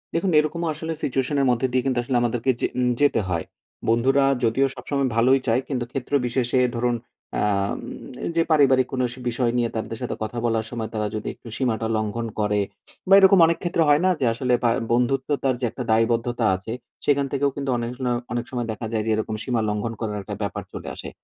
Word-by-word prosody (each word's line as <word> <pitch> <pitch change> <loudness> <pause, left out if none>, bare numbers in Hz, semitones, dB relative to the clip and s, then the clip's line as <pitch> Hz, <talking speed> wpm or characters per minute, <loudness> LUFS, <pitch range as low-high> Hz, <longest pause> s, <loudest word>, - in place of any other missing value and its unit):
দেখুন 180 +3 +1
এইরকমও 160 +3 +1
আসলে 160 +2 -4
situation 135 +2 0
এর 135 - +3
মধ্যে 125 +2 +1
দিয়ে 130 - +2
কিন্তু 130 -2 +1
আসলে 125 0 0
আমাদেরকে 120 +2 +1
যে - - +2
উম 125 -1 +2
যেতে 145 -5 +4
হয়। 85 -2 -1 0.4
বন্ধুরা 135 +4 +3 0.2
যদিও 120 +4 +3
সবসময় 140 -2 -1
ভালোই 130 +4 +4
চায়, 115 +3 +3
কিন্তু 125 -3 -1
ক্ষেত্রবিশেষে 125 -2 0 0.2
ধরুন 120 0 +1 0.4
আ - - 0 0.4
উম - - -7 0.4
এইযে 165 0 +1
পারিবারিক 135 -4 +5
কোনো 130 -1 0
সে 125 - -12
বিষয় 120 0 0
নিয়ে 120 -1 +1
তাদের 110 0 -4
সাথে 125 - -3
কথা 110 +3 -5
বলার 115 -1 +1
সময় 115 -2 -4
তারা 105 -1 -1
যদি 110 - -4
একটু - - -16
সীমাটা 115 -4 0
লঙ্ঘন 110 +2 -2
করে, 105 -1 +1 0.5
বা 195 - +5
এইরকম 190 0 +7
অনেক 165 0 +1
ক্ষেত্রে 170 -2 +1
হয় 145 +2 +5
না 185 - +5
যে 130 - +1
আসলে 125 +1 0
ভা 120 - +4 0.2
বন্ধুত্ব 125 +4 +1
তার 130 -2 +2
যে - - +1
একটা 125 - -5
দায়বদ্ধতা 115 +1 +1
আছে, 95 +5 -7 0.3
সেইখান 140 -1 +3
থেকেও 140 0 +1
কিন্তু 140 -2 -3
অনেক 120 0 -3
ন - - +1 0.2
অনেক 120 0 -2
সময় 120 -2 -2
দেখা 110 +1 -5
যায় 110 -2 0
যে 110 - -1
এইরকম 110 0 -2
সীমা 120 -4 0
লঙ্ঘন 105 +2 -2
করার 105 -2 -3
একটা 105 0 -6
ব্যাপার 100 - -3
চলে - - -7
আসে। - - -7
125 Hz, 210 wpm, -23 LUFS, 115-135 Hz, 0.5 s, এইরকম